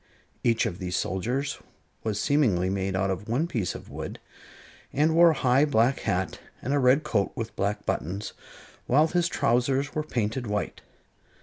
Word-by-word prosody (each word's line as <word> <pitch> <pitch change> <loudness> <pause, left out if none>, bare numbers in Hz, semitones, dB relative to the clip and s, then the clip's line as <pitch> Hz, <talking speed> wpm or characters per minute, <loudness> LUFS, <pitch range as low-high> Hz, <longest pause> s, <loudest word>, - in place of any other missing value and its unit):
Each 115 0 +3
of 95 -5 -3
these 90 -2 -3
soldiers 125 +10 -1 0.4
was 105 -2 -1
seemingly 105 -12 +2
made 95 -1 -1
out 95 +1 +1
of 95 +4 -5
one 130 +8 +1
piece 115 - -2
of - - -10
wood, - - -6 0.7
and 155 +3 +2
wore 170 +1 +7
a - - +3
high 130 +1 +3
black 130 -2 +3
hat 95 -1 -1 0.2
and 135 - -2
a 145 - +3
red 130 +3 +4
coat 100 -4 0
with 115 0 -5
black 100 +2 -1
buttons, 95 +6 -3 0.5
while 145 +5 +5
his 175 0 +2
trousers 135 0 +1
were 155 - 0
painted 120 -4 -2
white. 105 0 -3
115 Hz, 170 wpm, -27 LUFS, 100-140 Hz, 0.7 s, wore